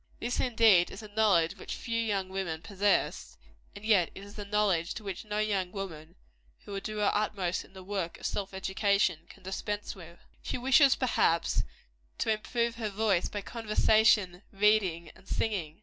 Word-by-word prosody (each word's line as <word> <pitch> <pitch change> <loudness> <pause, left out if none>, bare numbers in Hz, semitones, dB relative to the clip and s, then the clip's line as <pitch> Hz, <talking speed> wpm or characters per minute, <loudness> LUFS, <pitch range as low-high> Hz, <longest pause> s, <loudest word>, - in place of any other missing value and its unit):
This, 240 - -2
indeed, 225 -7 +4
is 200 - -9
a 210 - -10
knowledge 205 -6 +2
which - - -6
few 230 -1 -3
young 200 -4 -1
women 180 -4 -4
possess; 200 +1 0 0.4
and 200 - -10
yet 200 -6 +4
it 195 - -9
is 205 +1 -11
a 205 - -5
knowledge 200 -5 0
which 195 -4 -6
no 210 0 -3
young 200 -4 0
woman, 175 -5 -7 0.5
who - - -9
would 195 0 -3
do 215 +1 -5
her 210 -1 +2
utmost 200 -4 -1
in - - -20
the 190 -1 -10
work 190 -3 -4
of - - -9
self 195 -1 -2
education, 190 -2 +1
can - - -16
dispense 205 +2 -4
with. 170 -2 -12 0.2
She - - -3
wishes, 270 +2 +5
perhaps, 170 -9 +1 0.6
to 220 - +1
improve 235 +2 -2
her 220 -2 -2
voice 200 -3 +1
by 205 - -4
conversation, 215 -4 +2
reading 195 -5 +2
and 195 - -20
singing. 175 -8 -2
200 Hz, 175 wpm, -30 LUFS, 185-215 Hz, 0.6 s, wishes